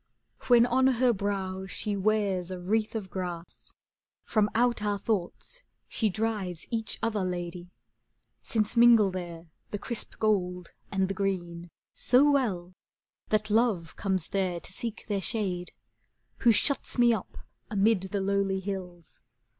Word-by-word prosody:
When 240 -1 +7
on 260 +2 +3
her 250 -1 +3
brow 190 -2 -3
she 205 +2 -3
wears 195 -3 0
a 185 - -4
wreath 215 +5 0
of 195 -5 -4
grass. 175 -2 -6 0.5
From 210 -1 +2
out 240 -1 +2
our 205 -1 0
thoughts 210 - -3 0.3
she 220 - +1
drives 205 -5 -2
each 225 -2 -2
other 220 -3 0
lady, 175 -1 -4 0.7
Since 215 -1 -1
mingle 230 -4 +6
there 175 -2 -6 0.2
the 205 - -3
crisp 230 +3 -5
gold 180 -5 0 0.2
and 190 -1 +1
the 195 - -2
green, 175 -3 -2
'^ - - -18 0.2
So 275 +4 +5
well 190 -11 0 0.6
that 215 0 +1
Love 210 -7 +1
comes 190 -4 -1
there 185 -3 -1
to - - -8
seek 230 +2 -5
their 205 -2 -1
shade. 180 -4 -1 0.7
Who 235 - +5
shuts 265 +7 +1
me 240 -1 +5
up 215 - -5 0.3
amid 210 -1 +3
the 190 +1 -2
lowly 195 0 +1
hills. 180 -3 -7
200 Hz, 145 wpm, -28 LUFS, 180-225 Hz, 0.7 s, When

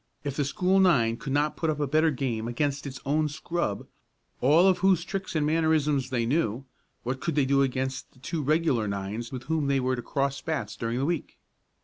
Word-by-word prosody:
If 140 -2 -3
the 145 - 0
school 180 +7 +2
nine 130 -12 +4
could 135 - -6
not 145 +2 +1
put 160 - -1
up 150 -1 -1
a 145 - +1
better 155 +4 +3
game 120 -5 -2
against 140 +3 -1
their 140 - -5
own 150 +2 +1
scrub, 155 -7 -3 0.5
all 155 +8 +5
of 185 - +3
whose 185 -3 +3
tricks 190 -1 -4
and 150 -1 +2
mannerisms 150 -4 +2
they 120 -3 0
knew, 130 -2 0 0.4
what 130 +2 -3
could 165 - -2
they 145 -3 +3
do 140 +1 +3
against 130 0 -2
the - - -25
two 155 +5 -4
regular 145 -6 +1
nines 100 +4 -4
with 125 -2 -6
whom 155 -1 -1
they 140 -1 +2
were 130 0 0
to 120 - -5
cross 140 +2 -1
bats 140 -10 -3
during 115 +1 -2
the 135 - 0
week? 170 0 -3
140 Hz, 215 wpm, -27 LUFS, 130-160 Hz, 0.5 s, all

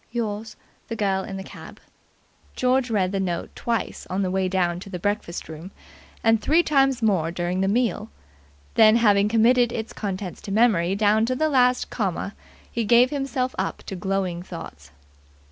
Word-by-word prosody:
Yours, 220 -2 -4 0.3
THE 230 - -4
GIRL 195 -3 0
IN 195 -3 -6
THE 190 - -6
CAB." - - -12 0.8
George 255 0 +1
read 190 -4 +1
the 195 - -1
note 175 -3 -3
twice 230 -3 -3
on 190 +2 -1
the 185 - -1
way 190 0 0
down 175 -2 0
to 195 - -10
the 185 - -5
breakfast 190 -2 -3
room, 160 +3 -9 0.5
and 225 -1 +3
three 320 +9 +3
times 270 -5 +2
more 185 -7 +2
during 175 +2 -2
the 195 - +1
meal; 230 0 0 0.6
then, 220 0 +6
having 205 -3 +4
committed 235 +2 +4
its 220 -1 -5
contents 190 -3 -5
to 200 - -7
memory 195 -5 +3
down 215 +2 +3
to 255 - 0
the 310 +4 +1
last 250 -3 +2
comma, 200 -2 -2 0.4
he 235 - -1
gave 240 +4 +5
himself 270 -3 -2
up - - -3
to 195 - -6
glowing 185 -1 -2
thoughts. 165 - -10
205 Hz, 175 wpm, -24 LUFS, 190-235 Hz, 0.8 s, then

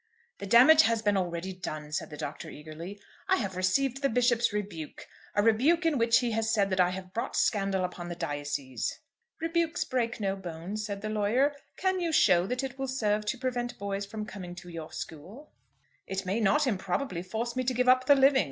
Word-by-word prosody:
"The 200 - -6
damage 260 +9 +8
has 230 -6 +1
been 205 -1 +2
already 180 0 -2
done," 155 -5 -6
said 150 - -3
the 150 - -9
Doctor, 150 - -6
eagerly. 160 +6 -9 0.3
"I - - +6
have 195 -4 -3
received 255 +9 +1
the 275 - +2
Bishop's 240 0 +2
rebuke, 200 -7 -5 0.3
a 205 - +3
rebuke 275 +11 +3
in 310 -5 +2
which 230 +2 +4
he 240 -1 -1
has 220 0 0
said 200 -3 +2
that 185 - 0
I 180 -1 +5
have 185 0 -7
brought 230 - -3
scandal 195 -3 +1
upon 175 -1 -6
the 175 - -4
diocese." 145 -4 -3 0.4
"Rebukes 330 0 0
break 235 -3 -1
no 195 -2 0
bones," 185 +3 -6
said 200 -1 -5
the 215 - -2
lawyer. 225 +7 +2 0.2
"Can 375 0 +1
you 340 -2 -1
show 180 - +4
that 250 +4 -2
it 265 0 -5
will 270 - -2
serve 215 -5 0
to 260 - -1
prevent 245 -1 -3
boys 200 0 -3
from 215 +1 -5
coming 185 -4 -8
to 180 0 -10
your 165 -2 -7
school?" 195 - -9 0.6
"It 195 0 -3
may 195 +5 0
not 285 +8 +3
improbably 195 -2 -1
force 225 +6 -4
me 255 - 0
to 255 - +1
give 250 +1 +1
up 255 0 +5
the 285 - +8
living. 270 0 +5
210 Hz, 205 wpm, -29 LUFS, 185-255 Hz, 0.6 s, damage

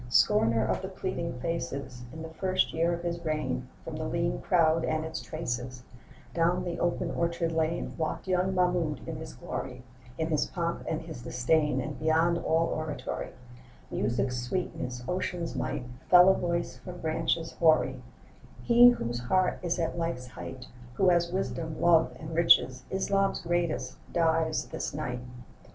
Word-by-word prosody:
SCORNER 115 - +4
of - - 0
the - - -4
pleading 125 - -4
faces, 140 -6 -3
In 160 +2 -7
the 160 - -6
first 185 +3 0
year 165 +1 +2
of 170 0 -3
his 170 0 -3
reign, 155 - -2 0.2
From - - -6
the - - -3
lean - - -1
crowd 165 - +3
and 155 0 0
its 160 0 -4
traces 125 -5 -4 0.5
Down 175 +2 +2
the 175 -1 -4
open 175 - 0
orchard 170 0 0
lane 160 +1 -1
Walked 160 +3 -2
young 185 +1 +1
Mahmoud 175 -6 +1
in - - -4
his - - -8
glory, 125 - -6 0.3
In 160 0 -1
his 155 -2 +1
pomp 170 -2 -2
and 160 0 -2
his 160 -7 -8
disdain 130 +4 +1
And 145 +2 -4
beyond 160 +2 +3
all 165 0 +1
oratory, 150 -5 -4 0.6
Music's 125 +1 0
sweetness, 125 -3 -3
ocean's 180 -1 -2
might, 130 -1 -2 0.3
Fell 180 +1 +9
a - - +7
voice 170 -9 -2
from 175 +7 -9
branches 165 +1 -1
hoary: 160 -2 +3 0.6
'He 240 +1 +8
whose 120 - -1
heart 185 +10 +1
is 175 0 -1
at 170 0 -1
life's 125 -7 -3
height, 130 +1 -8 0.3
Who 190 +5 +4
has 170 -1 +3
wisdom, 165 -4 -3
love, 165 -2 +5
and 160 +1 -7
riches, 130 -6 +4
Islam's 195 +1 +1
greatest, 175 -2 -1
dies 160 -1 +1
this - - -5
night. 125 -5 -3
160 Hz, 160 wpm, -29 LUFS, 135-175 Hz, 0.6 s, Fell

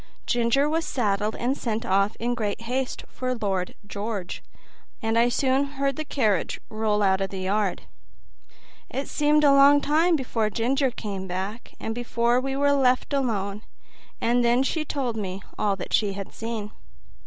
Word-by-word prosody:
Ginger 240 +4 +2
was 325 +2 0
saddled 210 -5 0
and 250 +3 0
sent 230 -3 -3
off 195 +1 +2
in 240 +1 -1
great 215 -3 -2
haste 250 +2 -3
for 255 0 -3
Lord 195 -5 -2
George, 205 -2 -4 0.6
and 225 -1 -1
I 235 +1 +4
soon 265 +2 +2
heard 275 -1 +1
the 310 - -3
carriage 215 - 0
roll 215 -1 +1
out 190 -1 +3
of 195 - -1
the 190 -1 -5
yard. 195 0 0 1.1
It 270 +1 -3
seemed 300 0 +3
a 285 -1 +6
long 280 +1 +7
time 320 +5 +3
before 235 -6 -1
Ginger 260 +6 +1
came 200 -5 -5
back, 190 +5 -5
and 225 - -3
before 240 +1 +1
we 270 +1 -2
were 285 +1 +3
left 260 0 +2
alone; 210 -7 -1 0.6
and 240 +1 +2
then 240 +2 +4
she 310 +3 -1
told 260 -6 -2
me 190 -2 -4 0.2
all 205 -2 +2
that 195 - -7
she 205 -3 +2
had 195 0 -7
seen. 225 -2 -5
235 Hz, 165 wpm, -25 LUFS, 205-270 Hz, 1.1 s, long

